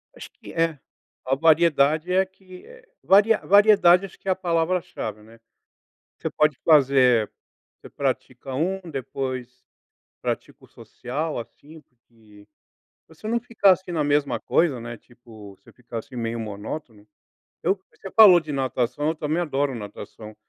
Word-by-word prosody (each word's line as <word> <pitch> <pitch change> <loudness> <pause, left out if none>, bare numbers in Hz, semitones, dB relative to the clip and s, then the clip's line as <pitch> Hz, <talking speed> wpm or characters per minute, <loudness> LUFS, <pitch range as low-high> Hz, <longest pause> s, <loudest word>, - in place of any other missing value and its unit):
Acho - - -10
que - - -13
é 165 -3 0 0.5
a 135 +1 +1
variedade 155 +1 +3
é 190 +1 +3
que, 185 -1 -16
eh, - - -16 0.2
vari 205 +3 +5 0.2
variedade 200 -3 +6
acho 190 - -14
que - - -17
é - - +3
a - - +2
palavra-chave, 165 - -2
né. 115 +1 -18 0.8
Você - - -3
pode 150 -3 +1
fazer 130 -7 +4 0.5
você - - -12
pratica 135 - -4
um, 185 +6 -1
depois 130 -2 -5 0.6
pratica - - -5
o - - -16
social, 145 +3 -5
assim, 150 +6 -13
porque 110 -5 -22 0.6
pra 160 - -19
você 215 - -9
não 235 +1 0
ficar 220 -5 +3
assim 185 0 -1
na 160 -3 0
mesma 145 0 0
coisa, 150 -8 +1
né, 120 0 -7
tipo, 110 -5 -15
você - - -20
ficar 120 -2 -8
assim 125 +3 -13
meio 115 0 -3
monótono. 105 +1 -7 0.6
Eu 190 +2 +1
você 195 - -11
falou 200 -6 +9
de 155 -2 -8
natação 135 +2 -1
eu 160 - -2
também 155 +2 -2
adoro 140 -4 -1
natação, 105 0 -10
145 Hz, 150 wpm, -23 LUFS, 120-175 Hz, 0.8 s, falou